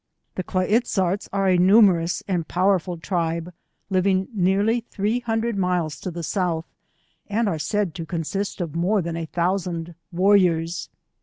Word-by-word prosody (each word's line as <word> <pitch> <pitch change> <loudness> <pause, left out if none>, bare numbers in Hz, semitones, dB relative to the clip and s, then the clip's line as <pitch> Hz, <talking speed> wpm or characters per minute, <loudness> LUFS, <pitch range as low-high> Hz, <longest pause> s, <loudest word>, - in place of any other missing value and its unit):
The - - -3
Kla 185 0 -1
iz 225 +6 +2
zarts 190 0 -1
are 195 0 +1
a 180 -1 +4
numerous 185 -3 +4
and 175 -5 -1
powerful 185 -1 +1
tribe, 170 0 -2 0.4
living 190 0 +2
nearly 200 +4 +2
three 220 0 -2
hundred 230 -1 -1
miles 180 -5 -1
to - - -4
the 170 -1 -6
South 170 -2 -1 0.6
and 215 +2 0
are 165 -6 -1
said 205 +1 -1
to 165 -1 -6
consist 180 +5 -3
of 165 -4 -4
more 185 +3 +1
than 165 0 -4
a 165 -1 -4
thousand 175 -1 -2 0.2
war 185 +4 +3
riors. 170 -3 +1
185 Hz, 160 wpm, -23 LUFS, 170-200 Hz, 0.6 s, a